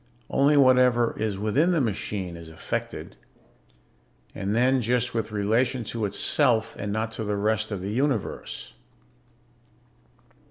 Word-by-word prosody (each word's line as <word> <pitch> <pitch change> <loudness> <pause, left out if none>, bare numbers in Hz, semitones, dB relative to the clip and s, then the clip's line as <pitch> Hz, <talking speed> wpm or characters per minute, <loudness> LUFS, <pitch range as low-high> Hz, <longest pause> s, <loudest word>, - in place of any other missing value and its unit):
Only 145 +2 +4
whatever 125 -3 +4
is 105 -3 -1
within 135 - +2
the 165 - +2
machine 100 -6 -2
is 85 -1 -10
affected, 80 - -5 1.2
and 100 +2 -2
then 130 +2 +3
just 120 +1 0
with 115 -1 -2
relation 115 +5 +1
to 110 0 -3
itself 110 +3 +1
and 105 0 -3
not 110 +2 -2
to 110 - -5
the 105 -1 -2
rest 110 +1 0
of 100 -3 -3
the 100 - -3
Universe. 130 -2 -2
110 Hz, 130 wpm, -25 LUFS, 105-125 Hz, 1.2 s, Only